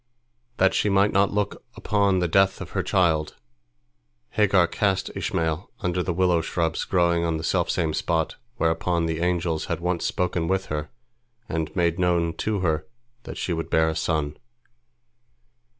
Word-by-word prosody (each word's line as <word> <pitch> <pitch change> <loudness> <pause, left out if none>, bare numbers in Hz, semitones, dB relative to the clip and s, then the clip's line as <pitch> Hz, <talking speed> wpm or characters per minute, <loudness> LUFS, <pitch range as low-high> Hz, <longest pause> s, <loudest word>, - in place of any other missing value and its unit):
That 95 0 +4
she 105 - +1
might 100 +1 +3
not 100 0 +3
look 105 -1 -2
upon 100 -2 +1
the 90 -1 +1
death 95 +3 +3
of - - -8
her - - 0
child, 80 -4 +1 1.0
Hagar 100 -4 +4
cast 95 +2 0
Ishmael 80 +2 -2
under 90 0 0
the 90 - -1
willow 90 -1 +2
shrubs 80 -1 -1
growing 85 -2 +2
on 85 -1 0
the 80 - -6
selfsame 80 0 0
spot 80 0 -1 0.2
whereon 85 +1 +1
the 80 -1 -2
angels 85 -2 0
had - - -3
once 90 0 -1
spoken 90 -2 -1
with 95 +1 0
her 75 0 -3 0.6
and 80 0 -2
made 85 -1 +1
known 85 -2 +2
to 105 -3 -1
her 80 -4 0 0.4
that - - -7
she 90 - -2
would 80 0 -3
bear 80 0 +3
a 80 - -3
son. 75 -2 -1
85 Hz, 160 wpm, -24 LUFS, 80-95 Hz, 1.0 s, That